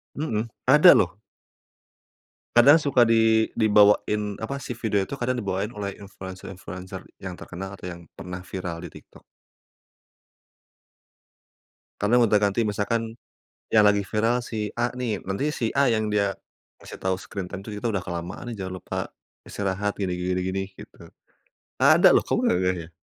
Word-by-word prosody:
Mhm. 115 -7 -2 0.2
Ada 150 +6 +8
lho. 90 +3 +1 1.4
Kadang 140 +7 +8
suka 135 -4 +3
di 110 -1 +3
dibawain, 105 -1 +3
apa, 110 +5 -4
si - - -6
video 105 -3 +1
itu 140 +6 -7
kadang 130 +1 0
dibawain 105 0 -3
oleh 100 -1 -3
influencer-influencer 95 -1 -9 0.2
yang 95 -2 -6
terkenal, 95 +2 -8
atau 90 -1 -7
yang 85 0 -10
pernah 90 0 -7
viral 90 -3 -5
di - - -7
TikTok. - - -15 2.8
Kadang 120 +3 +4
gonta-ganti, 105 +1 +2
misalkan 110 +2 -2 0.6
yang 105 -2 +6
lagi 100 0 +3
viral 115 +4 0
si 110 -3 -3
A 120 +1 0
nih, 120 -5 -3
nanti 100 +10 -2
si 115 -2 -1
A 140 -1 +3
yang 110 -2 +1
dia 100 -1 +1 0.5
ngasih - - -10
tahu 95 0 0
screen 95 0 -7
time 95 +1 -7
itu, 110 - -8
kita 120 - -2
udah 100 -4 -1
kelamaan 90 +7 -6
nih, - - -5
jangan 95 -1 -4
lupa - - -5 0.5
istirahat 100 +1 -2
gini 95 -3 -2
gini 90 +1 -1
gini, 95 +1 -2
gitu. - - -13 0.7
Ada - - +6
loh. - - +4
Kamu - - +1
nggak 90 - +3
ngeh, 90 0 +1
ya? - - -38
105 Hz, 155 wpm, -25 LUFS, 95-115 Hz, 2.8 s, Ada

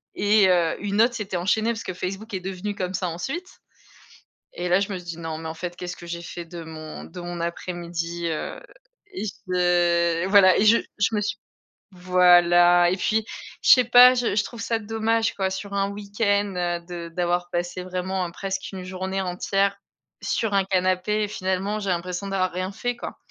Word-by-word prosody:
et 205 -1 +4
heu, 170 -3 +2
une 205 +1 +2
autre 235 +1 +4
s'était 195 -4 -3
enchaînée 215 +6 +1
parce 225 - -5
que - - -5
Facebook 195 +5 -6
est 190 - -1
devenu 190 +2 -5
comme 185 -1 -3
ça 180 -1 -1
ensuite 270 - -6 1.0
et 175 0 -3
là 180 +2 +4
je 200 +1 -2
me 190 - -3
suis 180 - -13
dit: 170 -1 -6
«Non 160 -1 -5
mais 160 0 -6
en 160 - -5
fait, 175 +1 -6
qu'est-ce 180 0 -6
que 175 - -11
j'ai 170 0 -5
fait 170 0 -7
de 170 0 -9
mon 155 -1 -8
de 180 - -10
mon 175 0 -6
après-midi?» 170 0 -4
Heu 155 - -4 0.5
et 365 - -4
je 175 -3 +1
voilà 195 -2 +6
et - - +3
je 230 +2 +7 0.2
je 205 +2 +1
me 210 - +1
suis 205 0 -3 0.5
voilà 175 -1 +5
et - - +1
puis 220 +3 0 0.4
je - - +6
sais 250 - +8
pas 245 +2 +8
je 245 -5 0
je 210 - +2
trouve 235 - -8
ça 230 - 0
dommage 225 +1 0
quoi, 190 -1 -1
sur 195 +1 -6
un 200 0 0
week-end, 205 0 -1
heu, 175 -1 -1
de 170 -1 -7
d'avoir 175 +1 -1
passé 175 +1 -3
vraiment, 185 0 -2
heu, - - -10
presque 190 +1 -4
une 185 -1 -6
journée 190 +1 -3
entière 195 +2 0 0.4
sur 220 -3 -1
un 195 -1 +3
canapé 185 +3 +1
et - - -1
finalement 195 +1 -2
j'ai 200 - -3
l'impression 180 +2 -2
d'avoir 190 -2 0
rien 185 +2 -3
fait, 245 +5 -3
quoi. - - -8
185 Hz, 200 wpm, -24 LUFS, 175-205 Hz, 1.0 s, sais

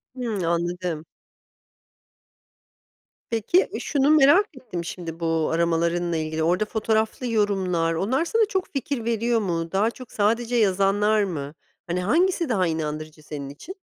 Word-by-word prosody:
Hımm, 225 -7 -3
anladım. 170 -1 -2 2.2
Peki, 235 - +2
şunu 285 -1 +1
merak 310 +6 +6
ettim 180 -9 -6
şimdi 165 -2 -6
bu 165 -2 0
aramalarınla 170 +1 +1
ilgili, 155 0 -2
orada 180 +6 +2
fotoğraflı 220 +3 -1
yorumlar, 190 -7 +1
onlar 245 - 0
sana 450 +5 +2
çok 380 -2 -2
fikir 275 -3 -3
veriyor 230 0 +1
mu? 170 -5 -2
Daha 205 +4 +2
çok 255 0 -12
sadece 230 +3 +1
yazanlar 205 0 +3
mı? 150 -6 -4 0.3
Hani, 175 +1 -1
hangisi 335 - +2
daha 190 -6 +2
inandırıcı 155 -1 -4
senin 145 -2 -6
için? 325 - -10
195 Hz, 130 wpm, -24 LUFS, 165-235 Hz, 2.2 s, merak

